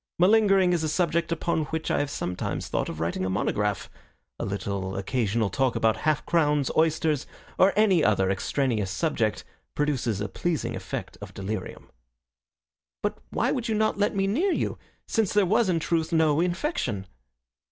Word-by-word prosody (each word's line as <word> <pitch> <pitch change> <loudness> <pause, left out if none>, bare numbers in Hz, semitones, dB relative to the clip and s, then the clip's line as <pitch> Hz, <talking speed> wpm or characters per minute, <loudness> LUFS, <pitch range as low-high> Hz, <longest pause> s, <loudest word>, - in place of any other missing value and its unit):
Malingering 195 -1 +4
is 170 -2 0
a 155 - 0
subject 170 +1 0
upon 165 -1 0
which 160 +1 -3
I - - +2
have 145 - -1
sometimes 90 -10 -3
thought - - -1
of 80 - -6
writing 85 +3 -1
a 95 - -1
monograph. 100 +1 -1 0.5
A - - -2
little 100 -1 -3
occasional 110 0 0
talk 130 +3 +1
about 110 -1 +2
half 155 -2 +2
crowns, 150 -4 +2
oysters, 155 -2 +1 0.3
or 190 +1 +6
any 195 -6 +4
other 100 -3 +3
extraneous 110 0 -1
subject 110 - -1 0.3
produces 130 -8 0
a 105 - -2
pleasing 165 - -2
effect - - -6
of - - -9
delirium." 95 0 -5 1.1
"But - - -1
why - - 0
would 245 -3 -2
you 220 - +1
not 215 -1 +1
let 205 0 +1
me 195 0 +1
near 305 - +1
you, - - -1 0.3
since 220 -4 0
there 205 -1 +4
was 215 +2 +2
in 170 -2 +2
truth 165 0 -1
no 160 -2 +3
infection?" 175 - -1
155 Hz, 165 wpm, -26 LUFS, -, 1.1 s, or